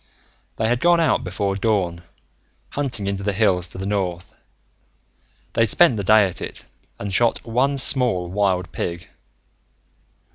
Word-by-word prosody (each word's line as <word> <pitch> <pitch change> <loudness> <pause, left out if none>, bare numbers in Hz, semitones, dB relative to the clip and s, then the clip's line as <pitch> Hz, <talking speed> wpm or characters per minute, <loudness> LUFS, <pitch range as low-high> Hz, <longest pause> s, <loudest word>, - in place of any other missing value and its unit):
They 110 - 0
had 120 +1 +1
gone 175 +3 +4
out 165 - +2
before 100 -1 -2
dawn, 95 -5 0 0.7
hunting 125 -8 -3
into 100 0 -2
the 100 +1 0
hills 95 -4 +1
to - - -10
the 95 - -4
north. 95 -4 -3 1.2
They'd 115 0 +3
spent 150 +3 +4
the 100 - -3
day 110 +1 +5
at 95 - -5
it, - - -3 0.3
and 100 -1 -5
shot 115 +3 +1
one 130 +5 +1
small 125 -10 +1
wild 95 -1 0
pig. 85 0 -5
100 Hz, 145 wpm, -22 LUFS, 95-120 Hz, 1.2 s, day